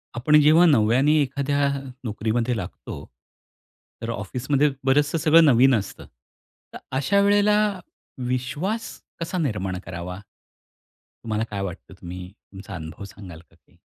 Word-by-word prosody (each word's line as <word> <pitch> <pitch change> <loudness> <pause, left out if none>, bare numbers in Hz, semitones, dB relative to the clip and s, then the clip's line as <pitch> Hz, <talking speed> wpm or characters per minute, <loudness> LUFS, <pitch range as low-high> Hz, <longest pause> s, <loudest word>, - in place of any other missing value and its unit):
आपण 150 +6 +4
जेव्हा 155 +4 +6
नव्याने 130 0 +4
एखाद्या 140 +1 0 0.3
नोकरीमध्ये 115 +2 -1
लागतो, 95 -5 -7 1.0
तर 115 - -4
ऑफिसमध्ये 125 +7 0 0.2
बरंचसं 145 +4 +2
सगळं 165 +1 +5
नवीन 130 -1 +5
असतं, 100 -3 -5 0.7
तर - - -6 0.2
अशा 190 +9 +2
वेळेला 205 +1 +4 0.7
विश्वास 150 - -2 0.3
कसा 170 +3 -3
निर्माण 105 - -2
करावा? 90 +1 -6 1.0
तुम्हाला 110 -1 -1
काय 100 -1 -3
वाटतं, 95 0 -7
तुम्ही 90 0 -7
तुमचा 100 -2 -12
अनुभव 80 +2 -8
सांगाल 95 -4 -11
का 80 0 -23
काही? 80 -2 -30
125 Hz, 120 wpm, -23 LUFS, 100-150 Hz, 1.0 s, जेव्हा